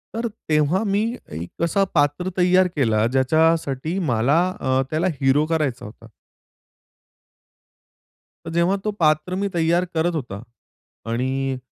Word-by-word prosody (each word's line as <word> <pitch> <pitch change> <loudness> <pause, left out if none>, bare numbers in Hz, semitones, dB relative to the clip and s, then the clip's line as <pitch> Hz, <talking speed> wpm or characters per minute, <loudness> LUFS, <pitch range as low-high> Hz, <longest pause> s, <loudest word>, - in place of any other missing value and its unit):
तर 235 +1 -1 0.2
तेव्हा 155 +7 +2
मी 200 0 +1 0.3
एक 85 - -6
असा 195 +4 +2
पात्र 145 +5 +1
तयार 180 +1 +4
केला, 110 -6 +2
ज्याच्यासाठी 155 +3 +1
मला 125 +8 +2 0.2
अ, 130 0 +1
त्याला 160 +4 +1
हिरो 135 +3 +3
करायचा 140 -6 -1
होता. 115 +2 -12 2.4
तर - - -5
जेव्हा 170 +3 +2
ते 215 - +1
पात्र 155 +3 +2
मी 200 +2 -1
तयार 170 +2 +2
करत 165 +1 0
होता 115 -9 -5 0.7
आणि 130 +2 -1
155 Hz, 125 wpm, -22 LUFS, 130-175 Hz, 2.4 s, तयार